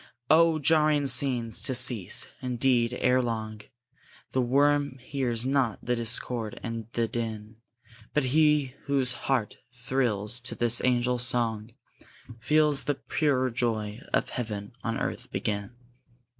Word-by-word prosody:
Oh, 165 0 +5
jarring 155 -1 +3
scenes! 125 -5 +1
to 130 - -1
cease, 120 -6 +3
indeed, 125 -1 +1
ere 130 +1 +3
long; 110 -3 -4 0.7
The 130 - +1
worm 140 +2 +2
hears 125 -2 -1
not 130 -5 +1
the 125 - +1
discord 115 -1 -1
and 115 -2 -5
the 115 -1 0
din; 110 -1 -5 0.5
But 150 - +1
he 150 0 +2
whose 135 -3 +1
heart 120 -3 -2
thrills 120 -3 -1
to 125 +1 -4
this 120 -1 +3
angel 125 0 +1
song, 115 -3 -1 0.6
Feels 150 +1 +2
the 145 0 0
pure 130 -4 0
joy 115 -2 -2
of - - 0
heaven 105 -4 -5
on 115 0 -2
earth - - -4
begin! 105 +3 -4
125 Hz, 130 wpm, -27 LUFS, 115-135 Hz, 0.7 s, Oh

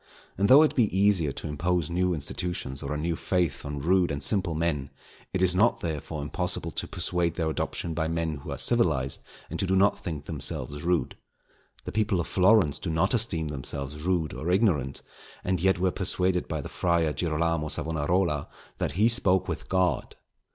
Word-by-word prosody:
And 100 +2 +1
though 140 +4 +9
it 155 - +2
be 120 - +4
easier 95 -7 +3
to - - -6
impose 85 +2 -1
new 90 +1 +1
institutions 75 -2 -4
or 70 - -5
a 75 - -1
new 85 +2 -1
faith 85 -5 -1
on 70 0 -5
rude 90 +3 +3
and 70 0 -3
simple 95 -6 +1
men, 80 -4 -1 0.4
it 95 - 0
is 90 -1 +4
not 110 +6 +3
therefore 75 -2 -4
impossible 85 +2 -2
to - - -4
persuade 85 -1 -1
their 80 -2 -1
adoption 80 +1 -3
by 80 0 -1
men 80 -2 -2
who 70 - -10
are - - -4
civilized, 80 - +2 0.3
and - - -2
who 95 - -1
do 95 - +2
not 100 +2 +3
think 80 -6 -5
themselves 75 -1 -1
rude. 85 +1 0 0.7
The - - -4
people 105 -3 +1
of 85 - -1
Florence 95 -6 +3
do 90 - -4
not 80 +7 +1
esteem 90 -10 +1
themselves 70 +1 -4
rude 85 -2 0
or 80 - -4
ignorant, 90 - +1 0.4
and 90 -2 -1
yet 95 +1 +3
were 90 0 +1
persuaded 90 -1 0
by 80 -2 -3
the - - -7
Friar 85 -3 +1
Girolamo 85 -1 0
Savonarola 80 0 0 0.3
that - - -1
he 105 +7 +3
spoke 95 -6 +3
with - - -5
God. 90 -6 0
85 Hz, 185 wpm, -27 LUFS, 75-95 Hz, 0.7 s, though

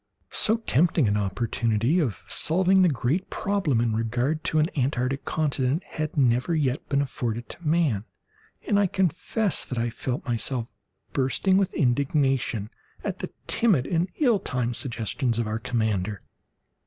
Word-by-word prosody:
So 220 +2 +3
tempting 165 - +2
an 100 - +1
opportunity 110 - 0
of 130 - -2
solving 185 +3 +3
the 180 - +5
great 150 +7 -1
problem 190 - 0
in 115 -2 +1
regard 120 +7 -1
to 155 - 0
an 155 - +4
Antarctic 135 -1 -1
continent 145 +1 0
had 155 0 -5
never 125 +4 +2
yet 140 -4 -1
been 140 0 +2
afforded 120 -4 -4
to 170 - -8
man, 150 -11 +1 0.6
and 200 - +3
I 200 - +3
confess 190 +3 0
that 125 - -5
I 115 0 0
felt 125 +2 -4
myself 120 0 -2 0.4
bursting 140 +8 +2
with 195 -1 +1
indignation 135 -5 +1 0.3
at - - -3
the - - -4 0.2
timid 190 - +2
and 170 +3 0
ill 240 -9 +3
timed 125 -5 -2
suggestions 120 -1 -1
of 115 - 0
our 110 +1 -2
commander. 110 -5 -1
135 Hz, 150 wpm, -25 LUFS, 115-165 Hz, 0.6 s, the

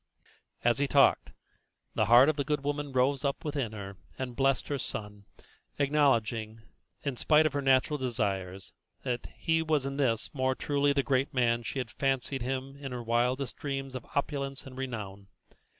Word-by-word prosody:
As 120 +2 +3
he 145 - +2
talked, 140 0 +4 0.6
the 110 - +2
heart 120 +4 +8
of 155 - +2
the 140 - -1
good 150 -1 -1
woman 145 0 -2
rose 130 +1 +2
up 140 +1 -2
within 140 -7 -2
her 100 -2 -7 0.2
and 130 -2 -4
blessed 135 0 +1
her 140 -1 -2
son, 105 -3 -6 0.5
acknowledging, 115 -6 +1 0.4
in 140 -4 -2
spite 155 +3 +4
of 155 - +1
her 145 - 0
natural 135 +2 +3
desires, 100 -7 -2 0.3
that 120 -1 -2
he 160 0 +1
was 155 -4 +1
in 135 0 -3
this 115 -6 0
more 130 -2 +1
truly 145 0 +1
the 140 -1 +1
great 135 +1 0
man 120 -2 +3
than - - -12
she - - -4
had 125 -4 -3
fancied 135 -1 -1
him 135 +2 -3
in 140 -2 -7
her 125 -1 -4
wildest 125 +3 0
dreams 135 -2 -4
of 130 -2 -7
opulence 140 -2 -2
and 130 -1 -10
renown. 105 -7 -6
135 Hz, 180 wpm, -30 LUFS, 120-140 Hz, 0.6 s, heart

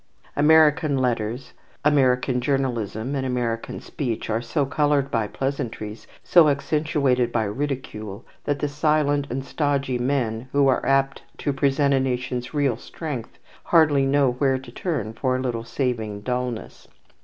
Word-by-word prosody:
American 150 -1 +4
letters, 120 -1 -1 0.3
American 130 -3 +3
journalism, 125 -3 -1
and 135 -2 -1
American 120 -3 -2
speech 120 -5 -4
are 110 +2 0
so 140 +4 0
coloured 145 0 +1
by 110 -3 0
pleasantries, 115 -5 -4 0.2
so 170 -4 +6
accentuated 140 -3 +1
by 115 - +1
ridicule, 110 -3 -4 0.2
that 145 -1 0
the 145 - -1
silent 145 -1 +1
and 135 +2 -3
stodgy 140 -3 -1
men, 120 -2 -1
who 140 -1 +4
are 130 - +2
apt 135 0 +2 0.2
to 145 - -1
represent 140 0 +2
a 135 - +3
nation's 125 -1 -2
real 140 -6 +1
strength, 140 -4 -6 0.3
hardly 155 -5 +4
know 135 -1 +3
where 130 +1 +1
to 130 -2 -11
turn 125 - -3
for 130 +2 0
a - - -1
little 120 -3 -2
saving 115 -5 -2
dulness. 125 -1 -4
135 Hz, 145 wpm, -24 LUFS, 120-145 Hz, 0.3 s, so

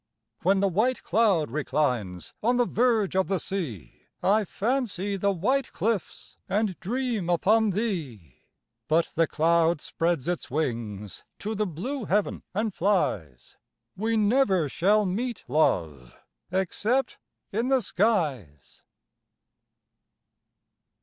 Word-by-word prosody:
When 195 +2 +3
the 200 - +3
white 220 +8 +1
cloud 190 - +2
reclines 125 - -1
On 245 +3 +2
the 245 - +3
verge 225 -6 +1
of 190 0 +2
the 195 - +1
sea, 155 - -5 0.2
I 210 +2 +3
fancy 205 -3 -1
the 200 +1 +1
white 250 +9 0
cliffs, 210 0 -3
And 205 -1 0
dream 230 -3 -2
upon 210 +5 +3
thee; 160 - -4 0.5
But 165 +2 +2
the 165 0 +2
cloud 165 0 +2
spreads 165 -3 -1
its 175 -1 -2
wings 115 -8 -3
To 215 +2 -4
the 215 0 -1
blue 225 - -4
heav'n 205 +2 0
and 215 0 0
flies. 95 - -1 0.4
We 220 +4 0
never 205 - +3
shall 205 +9 +2
meet, 225 +5 -3
love, 80 - 0 0.3
Except 205 +8 0 0.3
in 230 +5 -1
the 265 -2 +2
skies! 145 - -1
190 Hz, 115 wpm, -26 LUFS, 155-220 Hz, 0.5 s, When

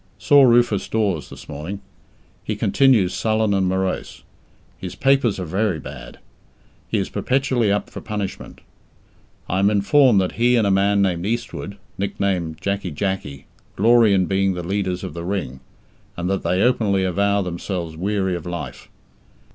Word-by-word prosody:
Saw 145 -1 +5
Rufus 120 -5 +4
Dawes 100 -8 -1
this - - -12
morning. 80 +8 -6 0.6
He 110 - -3
continues 105 -2 +3
sullen 110 -1 +1
and 95 -1 +1
morose. 95 0 -3 0.6
His 90 - -6
papers 135 -7 +2
are 90 - -3
very 95 +2 0
bad. - - -10 0.7
He - - -1
is - - -1
perpetually 130 -5 0
up 105 - 0
for - - -9
punishment. 105 -3 -6 0.9
I 95 - 0
am 100 +1 +4
informed 105 +3 +4
that 95 -1 0
he 125 +1 +4
and 115 -3 +3
a 100 - +2
man 100 +1 +3
named 90 -1 -1
Eastwood, 115 -3 -4 0.2
nicknamed 95 -5 -2
"Jacky 100 -1 -2
Jacky", 75 -5 -4 0.3
glory 115 +1 +5
in 95 -2 +3
being 95 0 +1
the 90 - -5
leaders 95 -1 -2
of - - -6
the 85 +1 -6
Ring, 90 -9 -3 0.6
and 85 +1 -2
that 95 - -1
they 90 +2 +1
openly 110 -6 +2
avow 100 +2 +1
themselves 85 -2 -4
weary 95 +1 -1
of 85 -1 -7
life. 85 -2 -7
100 Hz, 155 wpm, -21 LUFS, 90-110 Hz, 0.9 s, Saw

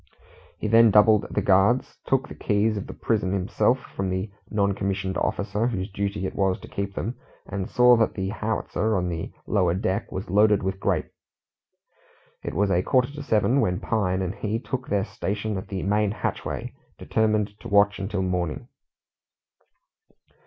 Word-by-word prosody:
He - - -3
then 115 +1 +6
doubled 105 0 +5
the - - -1
guards, 100 +6 +3
took 135 0 +1
the - - -9
keys 105 +1 +1
of 100 - -5
the - - -7
prison 105 -5 0
himself 100 +6 +1 0.2
from 95 -1 -1
the 95 +2 -2 0.2
non 100 -2 +1
commissioned 95 -1 -2
officer 100 +4 -1
whose 100 -4 -3
duty 100 0 -2
it - - -3
was 95 -2 +1
to - - -10
keep 100 0 -4
them, 120 +4 -3 0.3
and 95 -1 -4
saw 125 0 +6
that 110 - +1
the 95 -1 -2
howitzer 110 0 -1
on 90 0 -1
the 80 -1 -4
lower 90 -5 +2
deck 95 +2 -2
was 95 - -5
loaded 105 0 +4
with 95 0 -2
grape. - - -1 1.3
It - - -5
was 100 +2 +2
a 90 -1 +3
quarter 125 +6 +2
to 150 - -7
seven 125 +1 +2
when 90 0 0
Pine 95 -4 0
and 90 0 -2
he 110 +1 -2
took 125 +1 -5
their 100 -2 0
station 105 +1 -3
at 95 - -5
the 95 -2 -4
main 105 +1 +2
hatchway, 105 - -4 0.2
determined 105 -2 0
to - - -9
watch 100 -1 +3
until 95 0 -2
morning. 90 -4 -2
100 Hz, 175 wpm, -25 LUFS, 95-110 Hz, 1.3 s, then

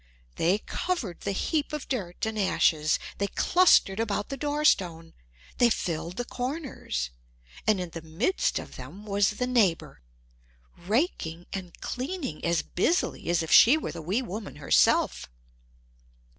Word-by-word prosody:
They 180 +5 +3
covered 225 - -3
the 200 - -2
heap 295 - -1
of 300 - -4
dirt 195 -9 -3
and 220 -1 -3
ashes, 155 -5 +2 0.2
they 200 - +1
clustered 270 - +4
about 205 -2 -1
the 275 - -3
door 295 +2 -2
stone; 165 - +2 0.5
they 245 - +6
filled 170 -4 -3
the 245 - -2
corners; 250 - -4 0.6
and 215 -3 +4
in 180 -2 -5
the 165 - -7
midst 165 - 0
of - - -7
them 205 +3 -10
was 200 -1 +2
the 250 - 0
neighbor, 200 - +1 0.7
raking 175 - -1
and 185 -3 -7
cleaning 265 - -4
as 170 -1 +1
busily 330 - 0
as 170 -1 +2
if 160 - -5
she 260 +7 +8
were 315 - -4
the 165 - -7
wee 195 +11 -1
woman 210 -2 -6
herself. 145 - +2
200 Hz, 145 wpm, -27 LUFS, 170-255 Hz, 0.7 s, she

